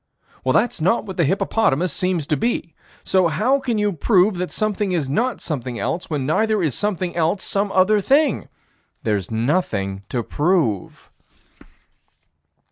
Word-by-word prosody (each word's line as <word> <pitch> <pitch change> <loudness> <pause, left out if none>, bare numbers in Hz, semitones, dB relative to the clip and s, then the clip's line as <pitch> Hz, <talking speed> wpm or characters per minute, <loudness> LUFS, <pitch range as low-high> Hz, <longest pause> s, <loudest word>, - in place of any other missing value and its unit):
Well, - - +1
that's 235 -8 +1
what 190 +2 0
the 170 - +2
hippopotamus 180 -2 +1
seems 180 -4 -1
to 150 - 0
be. 210 -5 -2 0.3
So 185 -2 +3
how 215 - +1
can 245 -4 -2
you 210 -1 +1
prove 190 +4 +3
that 180 - -2
something 210 -3 -1
is 160 -6 0
not 235 - -1
something 125 -6 -4
else, 170 +8 -3
when 145 -4 -2
neither 215 +6 +1
is 150 -5 0
something 185 -4 -2
else 170 +3 0
some 200 0 -1
other 200 +3 +3
thing? 280 +3 +2 0.5
There's 100 -4 -1
nothing 110 - -1
to 120 -2 -2
prove. 145 - -1
180 Hz, 145 wpm, -21 LUFS, 145-210 Hz, 0.5 s, So